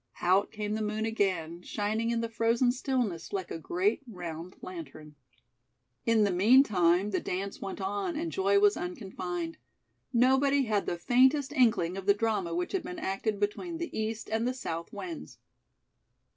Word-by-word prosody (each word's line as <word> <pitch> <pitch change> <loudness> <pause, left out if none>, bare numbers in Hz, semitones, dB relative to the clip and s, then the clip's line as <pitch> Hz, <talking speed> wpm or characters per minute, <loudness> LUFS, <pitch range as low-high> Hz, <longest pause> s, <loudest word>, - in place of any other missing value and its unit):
Out 190 +3 +3
came 210 -1 -3
the 220 - -2
moon 215 +1 -1
again, 185 -7 -1
shining 215 +4 -1
in 235 -1 0
the 230 - -1
frozen 230 +2 +2
stillness, 245 -9 -2
like 190 -3 -3
a - - -4
great 355 - 0
round 175 -4 -7
lantern. 155 -4 -8 0.9
In 225 -2 +4
the 200 - +2
meantime, 195 -3 +4
the - - +1
dance 195 +2 -4
went 195 +1 -5
on 200 - -2
and 325 +2 -2
joy 200 +1 +2
was 205 0 +5
unconfined. 190 - -5 0.5
Nobody 265 +3 +4
had 215 -4 0
the 175 - -1
faintest 260 - +3
inkling 220 - +3
of 195 0 -7
the 200 - +6
drama 205 -6 -1
which 175 +1 -2
had 385 - 0
been 355 +1 -7
acted 205 - -2
between 325 - -2
the 340 +1 -5
East 220 +1 -3
and 225 +2 0
the 255 - -1
South 165 -9 -5
winds. 340 -3 -7
210 Hz, 165 wpm, -30 LUFS, 185-250 Hz, 0.9 s, the